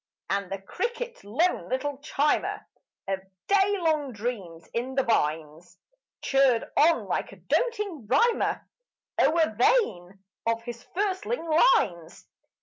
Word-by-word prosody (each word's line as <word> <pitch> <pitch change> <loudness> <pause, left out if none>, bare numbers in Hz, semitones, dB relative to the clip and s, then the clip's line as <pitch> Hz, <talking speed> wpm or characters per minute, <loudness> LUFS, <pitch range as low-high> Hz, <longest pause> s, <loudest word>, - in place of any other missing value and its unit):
And 200 -1 -1
the 195 - -3
cricket, 475 - -4
lone 270 - 0
little 270 +2 -2
chimer 295 0 0 0.4
Of 195 -1 -1 0.3
day 400 0 +3
long 305 -4 +1
dreams 200 -7 -5
in 255 +3 -3
the 270 - +2
vines, 160 -3 -1 0.5
Chirred 270 -4 +3
on 325 +2 +4
like - - -2
a - - -11
doting 415 - -2
rhymer 450 - +2 0.5
O'er 315 -2 +3
vain 195 - +1 0.2
of 230 0 0
his 235 0 -8
firstling 395 +1 -1
lines. 200 - +2
265 Hz, 120 wpm, -27 LUFS, -, 0.5 s, on